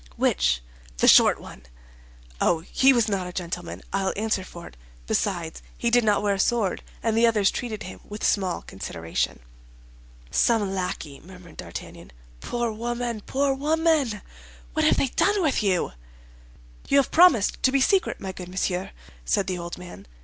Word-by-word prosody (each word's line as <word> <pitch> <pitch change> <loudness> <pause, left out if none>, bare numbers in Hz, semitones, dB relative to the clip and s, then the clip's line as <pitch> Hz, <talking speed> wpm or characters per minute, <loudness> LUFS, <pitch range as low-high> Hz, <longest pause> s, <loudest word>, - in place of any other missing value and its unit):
"Which?" - - +1 0.3
"The - - +3
short - - +7
one." 60 - -12 0.8
"Oh, 165 -2 +2
he 265 +10 +4
was 235 -4 +2
not 195 -3 -1
a - - -6
gentleman, 175 -1 -5
I'll 195 -1 0
answer 215 -2 -1
for 170 -2 -11
it; - - -12 0.3
besides, 170 - -2 0.2
he 235 - 0
did 245 0 +5
not 210 -1 +2
wear 205 -1 +2
a 195 - -3
sword, 215 -2 +1 0.2
and 225 -1 +1
the 230 +1 +5
others 210 -4 +3
treated 225 -3 -5
him 185 - -9
with 210 0 -9
small 190 -4 +1
consideration." 85 -7 -4 0.9
"Some 210 -5 +2
lackey," 180 -6 -4
murmured 180 -1 -14
D'Artagnan. 85 -6 -9 0.3
"Poor 240 - -2
woman, 235 0 -3
poor 275 +1 +1
woman, 295 - +1 0.5
what - - +1
have - - +4
they 270 - +1
done 410 +10 +2
with 285 -7 +1
you?" 190 -4 +1 1.0
"You 280 - +3
have 275 - +3
promised 320 - +5
to 260 - +3
be 275 - +3
secret, 375 +8 +2
my 190 - -5
good 180 -1 -9
monsieur?" 185 0 -2 0.3
said - - +1
the 185 -2 -3
old 170 0 -6
man. 175 - -11
200 Hz, 165 wpm, -25 LUFS, 180-240 Hz, 1.0 s, short